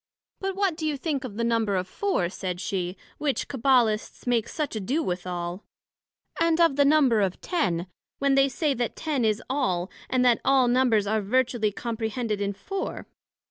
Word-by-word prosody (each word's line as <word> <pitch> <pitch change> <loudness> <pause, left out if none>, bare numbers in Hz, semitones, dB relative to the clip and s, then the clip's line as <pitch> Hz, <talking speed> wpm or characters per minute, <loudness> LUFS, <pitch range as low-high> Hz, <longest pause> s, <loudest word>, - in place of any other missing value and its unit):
But 385 -1 -2
what 390 -4 +1
do 315 -1 -3
you 295 -2 -1
think 285 -1 -2
of 220 -5 -7
the 235 - 0
Number 230 -3 +1
of 185 0 -1
Four, 385 - 0
said 180 -1 -4
she, 185 -1 -3 0.2
which 290 -3 -1
Cabbalists 245 -5 +1
make 240 -3 +1
such 300 -6 -3
ado 250 +10 -1
withal, 180 +1 -4 0.8
and 330 0 +3
of 330 -5 +4
the 285 0 +4
Number 275 -7 +4
of 190 -2 -1
Ten, 180 - -1 0.3
when 275 0 +2
they 275 0 +4
say 290 +3 0
that 240 -2 -2
Ten 295 -6 -1
is 215 -1 +1
all, 195 -10 -1 0.2
and 255 0 +2
that 240 -2 +4
all 265 -2 +4
Numbers 240 -4 +3
are 215 +1 +1
virtually 235 0 +1
comprehended 225 -1 -3
in 200 0 -1
Four? 390 - -5
240 Hz, 180 wpm, -26 LUFS, 205-280 Hz, 0.8 s, of